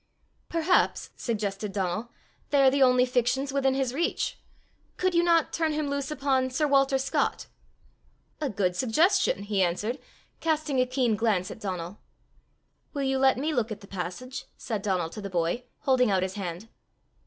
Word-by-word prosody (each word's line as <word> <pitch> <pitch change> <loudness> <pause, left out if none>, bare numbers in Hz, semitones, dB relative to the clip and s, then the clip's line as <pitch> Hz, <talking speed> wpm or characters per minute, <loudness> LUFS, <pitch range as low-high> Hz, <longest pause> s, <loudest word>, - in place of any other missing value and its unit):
"Perhaps," 335 +2 +1
suggested 210 -3 -3
Donal, 195 +4 -2 0.4
"they 280 -1 +4
are 265 - +6
the 275 +1 +1
only 250 -1 +5
fictions 255 +2 0
within 270 -1 +2
his 265 -2 0
reach! 335 +5 -1 0.6
Could 370 0 +1
you 340 - +4
not 335 -2 +3
turn 320 -2 0
him 300 -1 -1
loose 280 0 -2
upon 270 -3 +1
sir 270 +4 0
Walter 275 -1 +3
Scott?" 265 0 -1 1.0
"A 295 - 0
good 190 -4 0
suggestion!" 310 - +2
he 205 -1 0
answered, 205 +9 0 0.4
casting 310 -4 0
a 255 - +1
keen 250 -3 +1
glance 205 -5 0
at - - -9
Donal. 185 -2 -5 1.0
"Will 280 - -1
you 265 0 +1
let 265 -1 +4
me 305 +4 -1
look 235 -4 0
at 210 0 -6
the 200 - -13
passage?" 245 +9 -6
said 220 -4 -3
Donal 185 -5 -1
to 210 - -7
the 200 - -5
boy, 175 +7 -1 0.2
holding 255 -3 +3
out 190 -2 +2
his 185 0 -3
hand. 190 0 -5
250 Hz, 170 wpm, -27 LUFS, 200-275 Hz, 1.0 s, are